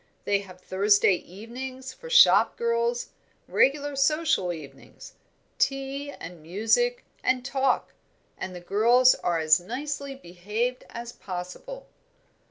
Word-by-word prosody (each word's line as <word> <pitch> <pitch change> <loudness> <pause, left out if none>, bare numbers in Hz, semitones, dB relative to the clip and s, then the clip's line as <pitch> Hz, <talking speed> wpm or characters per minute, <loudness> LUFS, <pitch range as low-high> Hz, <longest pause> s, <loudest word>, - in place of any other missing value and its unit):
They 200 -1 +1
have 185 -2 -12
Thursday 200 +2 +3
evenings 255 +8 -7
for 485 - -11
shop 480 0 +6
girls, 470 +1 0 0.4
regular 285 +1 +2
social 280 - +2
evenings 155 -5 -11 0.5
tea, 275 +1 -1
and 175 - -10
music, 225 - +1 0.2
and 255 0 +1
talk; 270 -1 0 0.4
and 185 -1 -6
the 175 - -8
girls 235 +7 +5
are 170 -1 -1
as 155 0 +4
nicely 275 +7 -5
behaved 215 +4 -4
as 235 0 -7
possible." 190 - -8
250 Hz, 115 wpm, -26 LUFS, 185-280 Hz, 0.5 s, shop